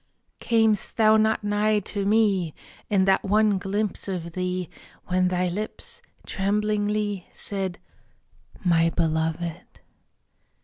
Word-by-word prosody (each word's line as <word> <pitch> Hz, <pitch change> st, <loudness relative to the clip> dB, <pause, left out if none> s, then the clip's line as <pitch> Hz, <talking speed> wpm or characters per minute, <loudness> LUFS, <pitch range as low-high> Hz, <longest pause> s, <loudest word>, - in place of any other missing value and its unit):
Cam'st 220 Hz, -3 st, +1 dB
thou 220 Hz, -1 st, +6 dB
not 220 Hz, 0 st, +2 dB
nigh 210 Hz, +1 st, +2 dB
to 200 Hz, 0 st, -2 dB
me 200 Hz, -7 st, +2 dB, 0.3 s
In 195 Hz, -2 st, +3 dB
that 195 Hz, 0 st, +3 dB
one 210 Hz, 0 st, +3 dB
glimpse 200 Hz, +1 st, -2 dB
of 175 Hz, -3 st, -4 dB
thee 180 Hz, 0 st, -2 dB, 0.4 s
When 185 Hz, 0 st, +2 dB
thy 180 Hz, 0 st, 0 dB
lips, 205 Hz, +5 st, -5 dB, 0.2 s
tremblingly, 205 Hz, -1 st, -1 dB
Said: 190 Hz, -3 st, -3 dB, 0.9 s
"My 165 Hz, -1 st, +4 dB
Beloved." 165 Hz, +1 st, -2 dB
195 Hz, 105 wpm, -25 LUFS, 180-210 Hz, 0.9 s, thou